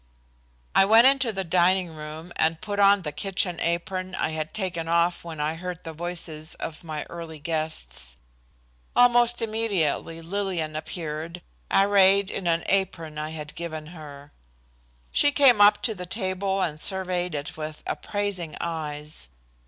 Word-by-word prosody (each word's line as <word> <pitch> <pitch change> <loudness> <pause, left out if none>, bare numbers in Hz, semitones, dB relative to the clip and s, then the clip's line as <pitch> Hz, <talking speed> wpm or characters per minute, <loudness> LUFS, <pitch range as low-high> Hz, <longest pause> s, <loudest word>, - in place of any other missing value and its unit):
I - - +6
went 225 +4 +7
into 265 -3 +4
the 195 -2 -3
dining 180 +1 +3
room 155 +2 -8
and 160 0 +1
put 205 -1 -4
on 200 -1 +5
the 150 - -3
kitchen 180 +3 -1
apron 185 +2 -2
I - - 0
had 155 -1 -3
taken 180 -5 -2
off 170 +1 +2
when 165 -2 -7
I 150 +1 0
heard 175 +1 -6
the 165 - -6
voices 160 -2 -3
of 160 +1 -7
my 155 -2 -4
early 165 -2 -8
guests. 145 - -3 0.8
Almost 240 -1 +4
immediately 200 -8 0
Lillian 170 -3 -2
appeared 160 +1 -5 0.3
arrayed 195 0 +5
in 190 - -4
the 170 0 +1
apron 165 -6 -1
I 155 0 -3
had 155 -1 -7
given 160 -2 -6
her. 145 -3 -11 0.8
She 290 - +4
came 265 -7 +6
up 205 0 +6
to 225 - +1
the 180 -3 -7
table 190 -1 -1
and 155 -2 -2
surveyed 180 -3 0
it 145 0 -5
with 155 0 -6
appraising 200 -6 -3
eyes. 150 - -4
170 Hz, 150 wpm, -25 LUFS, 155-195 Hz, 0.8 s, went